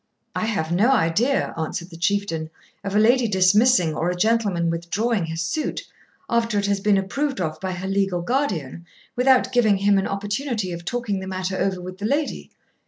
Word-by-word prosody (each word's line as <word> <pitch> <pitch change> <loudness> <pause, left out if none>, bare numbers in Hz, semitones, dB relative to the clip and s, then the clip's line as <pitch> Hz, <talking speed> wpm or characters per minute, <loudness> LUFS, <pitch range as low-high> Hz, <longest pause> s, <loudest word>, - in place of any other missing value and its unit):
'I - - -1
have 200 -8 -2
no 200 +8 +3
idea,' 240 +5 +1
answered 170 +2 -4
the - - -10
Chieftain, 170 -2 -1 0.3
'of 200 0 -3
a - - +5
lady 240 +3 +4
dismissing 190 -1 +4
or 165 +3 -1
a 180 - -1
gentleman 200 -4 +1
withdrawing 180 +5 -1
his 165 0 -3
suit, 300 - -2 0.4
after 230 -2 0
it 200 - +1
has 200 0 +1
been 200 0 +3
approved 270 +7 -2
of 155 -3 -3
by 185 +1 -3
her 185 +2 -5
legal 195 -3 0
guardian, 175 - -2 0.3
without 255 0 +3
giving 225 -5 +3
him 200 0 +3
an 195 - -1
opportunity 205 +1 -2
of 170 0 -7
talking 220 -1 -2
the 190 - -7
matter 185 0 -3
over 190 -1 -1
with 185 +1 -8
the 205 - -1
lady. 290 +4 -2
195 Hz, 185 wpm, -23 LUFS, 175-230 Hz, 0.4 s, a